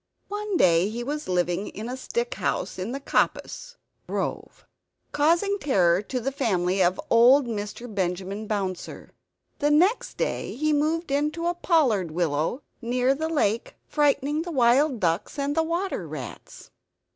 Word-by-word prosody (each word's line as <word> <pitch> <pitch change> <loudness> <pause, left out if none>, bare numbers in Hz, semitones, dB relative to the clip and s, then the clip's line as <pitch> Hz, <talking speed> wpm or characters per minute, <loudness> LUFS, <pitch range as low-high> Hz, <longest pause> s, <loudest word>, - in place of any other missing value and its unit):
One 415 -1 -2
day 175 - +4
he 235 +2 -4
was 295 +4 -4
living 180 +2 0
in 215 +3 -7
a 250 - -4
stick 475 - -3
house - - -2
in 190 +6 -3
the 275 - -4
coppice - - -1 0.3
[grove], - - -4 0.5
causing 340 +7 +2
terror 185 - +3
to 250 +5 -4
the 265 +3 -2
family 190 -8 0
of 180 +1 +2
old 250 +4 +6
Mr. 215 0 -5
Benjamin 190 +2 -2
Bouncer. 195 -4 -4 0.5
Next 315 +11 +2
day - - -2
he 310 +4 +1
moved 310 +2 0
into 300 +4 0
a 345 - +1
pollard 275 - +2
willow 165 - -1 0.2
near 250 +2 +1
the 315 +3 -3
lake, 230 -8 0
frightening 295 0 +1
the 350 - -5
wild 260 0 +3
ducks 170 - -1
and 285 +1 -1
the 325 - +3
water 335 - -2
rats. 145 -6 -9
255 Hz, 145 wpm, -25 LUFS, 195-310 Hz, 0.5 s, old